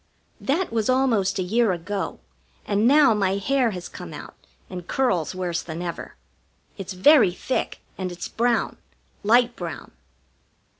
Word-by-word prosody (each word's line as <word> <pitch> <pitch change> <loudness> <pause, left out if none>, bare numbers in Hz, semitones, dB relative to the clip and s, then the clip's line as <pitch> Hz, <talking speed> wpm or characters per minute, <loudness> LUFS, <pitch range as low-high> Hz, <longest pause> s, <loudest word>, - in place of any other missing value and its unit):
That 305 0 -1
was 220 -1 0
almost 235 -7 +2
a 185 - 0
year 220 +3 +2
ago, 185 +3 -4 0.5
and 205 +3 +2
now 285 -2 +6
my 195 -2 +1
hair 255 +4 +1
has 180 -4 -6
come - - -9
out - - -9 0.3
and 180 -2 -8
curls 185 - 0
worse 175 -2 -2
than 170 +1 -6
ever. 170 -1 -6 0.6
It's 195 -1 -6
very 190 - +5
thick, 260 - -3 0.2
and 185 -1 -3
it's 175 - -6
brown 235 0 0 0.5
light 240 +3 +4
brown. 170 -2 -7
205 Hz, 145 wpm, -24 LUFS, 180-245 Hz, 0.6 s, now